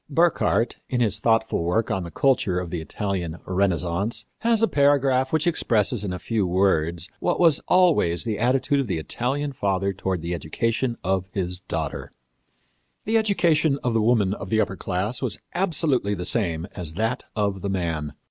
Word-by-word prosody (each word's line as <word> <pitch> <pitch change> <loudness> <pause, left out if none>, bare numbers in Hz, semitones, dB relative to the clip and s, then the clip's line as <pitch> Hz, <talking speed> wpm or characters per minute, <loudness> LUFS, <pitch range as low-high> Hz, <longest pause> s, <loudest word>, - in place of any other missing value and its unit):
Burckhardt, 160 -6 +2
in 125 - 0
his 110 -3 +2
thoughtful 110 -4 +1
work 90 +7 0
on 95 - 0
the 85 - -6
culture 100 -5 +1
of 90 -2 -6
the 85 -3 -3
Italian 90 -1 -3
Renaissance, 95 +3 0
has 230 -1 +2
a - - +5
paragraph 135 -4 +3
which 160 -1 +1
expresses, 115 - +1
in 100 - -3
a 90 - -3
few 105 0 -1
words, 85 -2 +1
what - - 0
was 165 -5 +5
always 165 - +3
the 110 -3 -3
attitude 135 +4 +2
of 135 - -1
the 90 - -1
Italian 135 - -2
father 100 -4 0
toward 95 -3 -3
the 85 +1 -2
education 115 +7 -1
of 95 0 -1
his 90 -2 -2
daughter. - - -4 0.9
"The 225 +1 +3
education 165 -9 +2
of 120 - 0
the 115 - +2
woman 105 -4 +3
of 95 -2 -7
the 110 - +2
upper 95 -3 0
class 95 +6 -2
was 115 -7 -2 0.2
absolutely 150 - 0
the 90 - -5
same 85 -7 -1
as 85 -4 -4
that 110 +5 -1
of 100 -3 -1
the 100 - -2
man. 80 -6 -2
105 Hz, 175 wpm, -24 LUFS, 90-130 Hz, 0.9 s, a